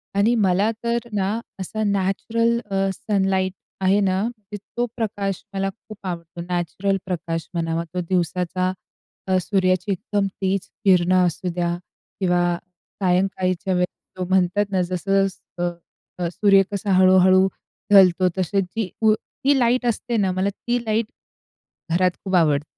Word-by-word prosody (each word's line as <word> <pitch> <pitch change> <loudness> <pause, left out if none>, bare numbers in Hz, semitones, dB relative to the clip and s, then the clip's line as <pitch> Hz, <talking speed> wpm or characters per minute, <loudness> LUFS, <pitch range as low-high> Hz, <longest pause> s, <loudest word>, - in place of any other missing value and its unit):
आणि 205 +4 +3
मला 200 0 +3
तर 235 0 -1
ना, 205 +3 0 0.2
असा 215 +4 -3
नॅचरल 225 +4 +1
अ, 195 0 +1
सनलाइट 190 -2 0 0.3
आहे 190 +2 +4
ना, 190 -1 +1
म्हणजे 215 -3 -6 0.2
तो 240 - +2
प्रकाश 200 -4 -2
मला 195 0 -1
खूप 215 +1 -13
आवडतो. 170 -1 -6
नॅचरल 180 +3 -1
प्रकाश 165 -3 -3
म्हणावा 165 0 -1
तो 180 - -1
दिवसाचा, 180 +1 0 0.6
अ, 185 - +3
सूर्याची 185 -1 +1
एकदम 200 +1 -1
तेज 190 0 -1 0.2
किरणं 185 -1 +4
असू 180 +1 -2
द्या 175 -1 0 0.4
किंवा 175 -2 +2 0.4
सायंकाळीच्या 185 0 +1
वेळेला 180 +1 -3
तो - - 0
म्हणतात 190 +2 +2
ना, 185 -2 +2
जसं-जसं 180 -1 -1 0.4
अ, 175 - 0
सूर्य 195 +2 +4
कसा 200 0 -2
हळू-हळू 185 0 +6 0.4
ढलतो 185 -2 +6
तसे 190 +2 +1
जी 195 +2 -3
उ 220 -1 +5
ती 275 +5 -1
लाईट 245 +1 +2
असते 235 0 -1
ना, 195 -3 +2
मला 185 +2 0
ती 240 +4 -2
लाईट 220 +1 +1 0.9
घरात 180 +2 +3
खूप 190 -1 -1
आवड 150 -4 +3
190 Hz, 140 wpm, -22 LUFS, 180-205 Hz, 0.9 s, हळू-हळू